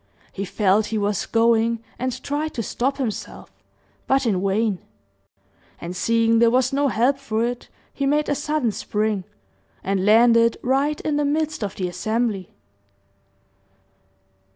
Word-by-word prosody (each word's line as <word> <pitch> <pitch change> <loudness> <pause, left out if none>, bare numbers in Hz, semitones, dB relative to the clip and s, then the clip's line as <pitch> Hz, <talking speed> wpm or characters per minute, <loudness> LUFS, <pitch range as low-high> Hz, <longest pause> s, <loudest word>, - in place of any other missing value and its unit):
He 195 - -4
felt 205 +2 +2
he 220 - -2
was 205 -2 -1
going, 230 0 +2 0.2
and 255 0 -3
tried 300 +2 -3
to 230 - -2
stop 265 +6 -1
himself, 245 -7 -5 0.6
but 270 0 +2
in 195 -5 0
vain; 200 0 +1 1.0
and 175 +2 -6
seeing 230 +3 +2
there 235 0 +5
was 255 +2 +2
no 285 +1 +2
help 260 +3 +1
for 230 -4 -1
it, 245 0 -5 0.2
he 275 - -1
made 300 +2 +1
a - - +1
sudden 295 -4 -1
spring, 210 -2 -2 0.6
and 195 -1 0
landed 230 +2 +5
right 275 +4 +1
in 300 -1 -1
the 295 - +1
midst 310 -2 -1
of 200 - -4
the 185 - -2
assembly. 210 +1 -2
230 Hz, 145 wpm, -22 LUFS, 210-275 Hz, 1.0 s, there